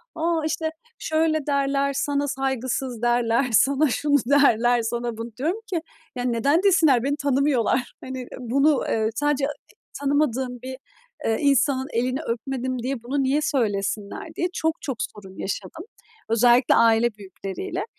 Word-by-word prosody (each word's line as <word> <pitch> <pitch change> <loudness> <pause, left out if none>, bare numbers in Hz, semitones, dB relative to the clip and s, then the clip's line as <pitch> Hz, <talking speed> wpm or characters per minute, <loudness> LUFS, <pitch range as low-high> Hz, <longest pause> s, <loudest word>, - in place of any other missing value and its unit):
a, 330 0 0
işte, 315 0 -1 0.3
"Şöyle 315 -1 0
derler, 280 0 +1
sana 285 +1 0
saygısız 260 -2 -2
derler, 240 +1 +2
sana 275 +6 +4
şunu 285 +3 +2
derler, 245 -3 +4
sana 235 0 -3
bunu" 230 +1 -6
Diyorum 325 - -1
ki 335 - 0 0.3
yani, 245 -1 -1
"Neden 280 +10 +2
desinler, 320 - +4
beni 280 +2 0
tanımıyorlar?" 275 -3 +1
Hani, 260 -1 -6
bunu, 275 +4 +2
eee, 220 -1 +1
sadece 290 +1 +1 0.5
tanımadığım 265 -4 0
bir, 260 0 -6 0.5
eee, 225 - +1
insanın 275 -2 +2
elini 255 +4 0
öpmedim 255 0 -3
diye 260 -2 -3
bunu 270 +3 -1
niye 275 +3 +1
söylesinler 205 -7 -2
diye 350 - 0
çok 320 -2 -1
çok 270 -5 -4
sorun 195 -4 -7
yaşadım. 200 - -5 0.4
Özellikle 240 +2 +4
aile 230 0 +4
büyükleriyle 195 - -6
260 Hz, 135 wpm, -24 LUFS, 235-285 Hz, 0.5 s, sana